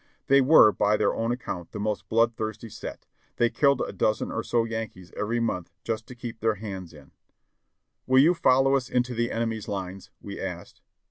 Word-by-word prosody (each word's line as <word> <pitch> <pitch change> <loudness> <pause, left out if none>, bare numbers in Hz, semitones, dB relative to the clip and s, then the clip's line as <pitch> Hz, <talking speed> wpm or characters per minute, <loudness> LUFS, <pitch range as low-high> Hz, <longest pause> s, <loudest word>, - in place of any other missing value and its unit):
They 140 0 +5
were, 130 -5 +7
by 105 +1 +2
their - - +2
own 115 +1 -1
account, 95 -8 -5
the - - -5
most 105 0 -3
blood 115 +1 +3
thirsty 110 +1 -5
set; - - -8 0.3
they 120 0 +2
killed 140 -3 +3
a - - -2
dozen 110 0 0
or - - -2
so 120 -1 +1
Yankees 110 -5 -6
every 115 +3 -1
month 90 -7 -2
just 110 -1 -3
to 125 - -10
keep 120 -1 -7
their 110 0 +1
hands 95 -4 -7
in. 75 -4 -16 1.0
"Will 130 0 +4
you 155 +6 +6
follow 135 -4 +3
us 130 -3 -1
into 125 0 0
the 120 0 -1
enemy's 115 -2 -2
lines?" 95 -1 -5
we - - -8
asked. - - -7
115 Hz, 195 wpm, -26 LUFS, 105-125 Hz, 1.0 s, were